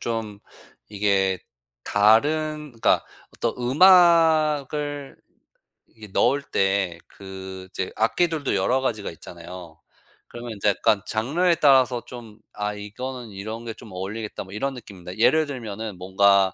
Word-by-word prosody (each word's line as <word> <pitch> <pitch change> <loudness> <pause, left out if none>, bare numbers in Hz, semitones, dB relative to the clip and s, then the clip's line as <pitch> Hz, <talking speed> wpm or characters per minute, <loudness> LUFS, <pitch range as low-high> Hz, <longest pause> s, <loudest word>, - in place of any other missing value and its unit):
좀 110 -3 -4 0.5
이게 100 -2 +1 0.5
다른 150 +8 +2
그러니까 - - +3 0.3
어떤 115 - -1
음악을 150 -2 +4 0.7
이게 110 -1 -14
넣을 140 +4 +3
때 95 -7 0
그 95 -1 -9
이제 95 - -4
악기들도 150 +5 +1
여러 110 +7 +2
가지가 110 -6 -2
있잖아요. 85 0 -11 0.5
그러면 120 0 -8
이제 105 +1 +1
약간 100 0 +2
장르에 160 +11 +1
따라서 130 -5 +4
좀 120 -3 -11
'아 105 0 -3
이거는 120 +4 -7
이런 110 +4 -7
게 115 - -5
좀 110 -1 -14
어울리겠다.' 100 +4 -5
뭐 95 - -13
이런 135 +6 -2
느낌입니다. 95 -6 -10
예를 155 +7 +4
들면은 110 -6 -6
뭔가 95 +1 +3
110 Hz, 280 characters per minute, -24 LUFS, 100-135 Hz, 0.7 s, 음악을